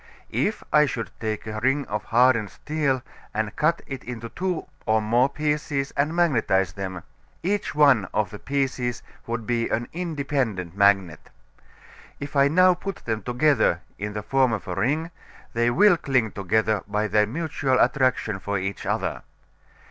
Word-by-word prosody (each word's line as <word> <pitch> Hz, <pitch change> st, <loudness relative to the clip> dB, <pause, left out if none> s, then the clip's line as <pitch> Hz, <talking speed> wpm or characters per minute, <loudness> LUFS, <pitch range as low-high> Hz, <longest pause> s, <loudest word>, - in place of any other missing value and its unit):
If 210 Hz, 0 st, 0 dB
I 150 Hz, -1 st, +6 dB
should 115 Hz, -4 st, -4 dB
take 110 Hz, -1 st, -3 dB
a 110 Hz, 0 st, -4 dB
ring 135 Hz, +4 st, +1 dB
of 105 Hz, 0 st, -4 dB
hardened 115 Hz, -3 st, +3 dB
steel 145 Hz, -4 st, -1 dB, 0.3 s
and 110 Hz, -1 st, -2 dB
cut 165 Hz, +3 st, +1 dB
it 135 Hz, -1 st, -7 dB
into 115 Hz, -1 st, -6 dB
two 180 Hz, +5 st, -3 dB, 0.2 s
or 110 Hz, 0 st, +4 dB
more 120 Hz, +5 st, +2 dB
pieces 150 Hz, -1 st, -1 dB
and 150 Hz, +4 st, 0 dB
magnetize 115 Hz, -, +2 dB
them, 95 Hz, -3 st, -5 dB, 0.4 s
each 200 Hz, 0 st, -1 dB
one 140 Hz, -9 st, +5 dB
of 105 Hz, -3 st, 0 dB
the 105 Hz, -, -8 dB
pieces 130 Hz, -3 st, -2 dB, 0.2 s
would 115 Hz, -1 st, -3 dB
be 115 Hz, -1 st, 0 dB
an 120 Hz, +2 st, -1 dB
independent 140 Hz, -, -2 dB
magnet. 100 Hz, -5 st, +2 dB, 0.9 s
If 145 Hz, 0 st, -6 dB
now 155 Hz, +7 st, +5 dB
I -, -, +3 dB
put 195 Hz, +2 st, -5 dB
them 110 Hz, -2 st, -1 dB
together 125 Hz, -, +2 dB, 0.2 s
in 105 Hz, +1 st, -4 dB
the 105 Hz, 0 st, -4 dB
form 130 Hz, 0 st, +2 dB
of 105 Hz, -, -4 dB
a 90 Hz, -, -3 dB
ring 145 Hz, -, 0 dB, 0.4 s
they 120 Hz, +1 st, +2 dB
will 195 Hz, +7 st, +5 dB
cling 130 Hz, -9 st, +1 dB
together 105 Hz, +1 st, 0 dB
by 105 Hz, +1 st, 0 dB
their 105 Hz, +1 st, +3 dB
mutual 140 Hz, -1 st, -1 dB
attraction 125 Hz, -6 st, +2 dB
for 100 Hz, +1 st, -2 dB
each 95 Hz, +1 st, -4 dB
other. -, -, -1 dB
120 Hz, 160 wpm, -24 LUFS, 105-145 Hz, 0.9 s, I